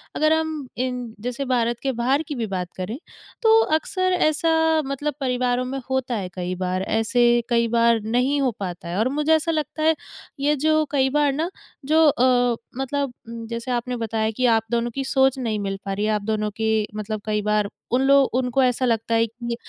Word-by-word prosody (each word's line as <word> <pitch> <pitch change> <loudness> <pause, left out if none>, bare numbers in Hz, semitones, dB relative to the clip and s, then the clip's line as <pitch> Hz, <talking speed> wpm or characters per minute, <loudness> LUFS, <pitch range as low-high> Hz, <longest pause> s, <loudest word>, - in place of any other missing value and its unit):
अगर 310 +1 +3
हम 315 -4 -2
इन 250 0 -1 0.2
जैसे 250 +3 -3
भारत 240 -2 0
के 270 - +1
बाहर 260 +5 +1
की 295 - -4
भी 230 -2 -2
बात 180 -2 -3
करें 210 +7 -4 0.4
तो 445 -1 +6 0.2
अक्सर 370 +2 -1 0.2
ऐसा 320 0 +2
मतलब 285 +2 -2
परिवारों 250 -1 0
में 270 +1 -4
होता 260 -2 -1
है 190 -4 -3
कई 180 0 -3
बार, 185 0 -2
ऐसे 240 +3 +2
कई 235 -1 +2
बार 230 0 +3
नहीं 250 +6 +1
हो 260 -3 +2
पाता 180 -2 -5
है। 175 - -3
और 230 - +2
मुझे 300 +3 +1
ऐसा 330 +1 0
लगता 310 0 -2
है 320 0 +4 0.4
ये 295 +2 +2
जो 310 +2 +2
कई 265 -2 +2
बार 295 0 +2
ना 320 +5 -1 0.4
जो 315 +2 +4
अ, 245 -3 +3 0.2
मतलब 270 -1 -2 0.4
जैसे 235 +2 -4
आपने 245 +1 -1
बताया 220 -1 -1
कि 250 +3 -1
आप 225 -2 +4
दोनों 235 0 0
की 270 +3 -3
सोच 265 0 +2
नहीं 220 -4 -1
मिल 195 -1 -3
पा 195 - -2
रही 205 +2 -1
है, 215 - +1
आप 210 -1 0
दोनों 215 0 -1
के 220 - 0 0.3
मतलब 215 0 -4
कई 210 -1 0
बार 210 -1 +1 0.2
उन 250 +2 +3
लो 275 0 +6 0.2
उनको 255 +1 +1
ऐसा 255 0 +1
लगता 230 -1 0
है 225 0 +3
कि 235 +1 -5
245 Hz, 205 wpm, -23 LUFS, 225-280 Hz, 0.4 s, तो